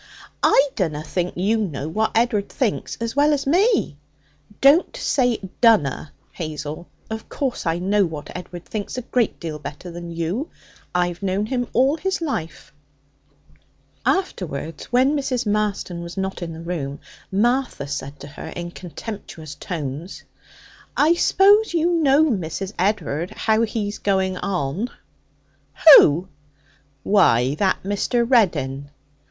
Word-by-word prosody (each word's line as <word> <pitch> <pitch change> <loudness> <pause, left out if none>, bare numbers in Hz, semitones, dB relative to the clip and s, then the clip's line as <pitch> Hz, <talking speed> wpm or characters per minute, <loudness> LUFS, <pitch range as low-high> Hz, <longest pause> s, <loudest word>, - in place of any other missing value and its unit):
'I 280 +1 +4
dunna 155 -6 -1
think 180 +2 -2
you 205 +5 +2
know 160 -9 -3
what 215 +7 -1
Ed'ard 225 -4 +1
thinks 245 -7 -2
as 230 +1 -3
well 290 +1 +4
as 280 -1 -1
me.' 365 - +2 0.6
'Don't 285 +6 +4
say 245 -4 +1 0.2
"dunna," 165 - +3 0.2
Hazel. 155 0 -6 0.2
Of 220 0 -6
course, 260 -9 -3
I 165 +1 +1
know 195 +2 +2
what 155 -3 -8
Edward 175 -1 -8
thinks 215 +2 -5
a 250 - -3
great 240 -2 0
deal 155 -2 -5
better 150 +5 -8
than 170 0 -7
you. 170 - -3 0.5
I've 175 0 0
known 195 +1 0
him 245 +1 -2
all 270 +5 +3
his 380 +2 -1
life.' 265 - -4 1.3
Afterwards, 165 - -2
when 260 +4 +2
Mrs. 255 -4 -1
Marston 205 -4 -1
was 170 +2 -8
not 190 -1 -3
in 165 -1 -5
the 160 - -8
room, 155 -5 -4 0.3
Martha 240 - 0
said 140 0 -5
in 145 - -8
her - - -8 0.2
contemptuous 175 -3 -8
tones: 155 +1 -6 0.7
'I 310 +3 +5
s'pose 395 +3 +4
you 335 +1 +2
know, 300 -3 +4
Mrs. 195 - -2
Ed'ard, 180 -4 0
how 220 0 +1
he's 215 -2 -2
going 190 -2 +1
on?' 180 - -2 1.1
'Who?' 165 +6 +3 0.8
'Why, 135 - +4
that 190 +5 0
Mr. 205 +5 0
Reddin.' 145 - +1
195 Hz, 135 wpm, -22 LUFS, 165-245 Hz, 1.3 s, I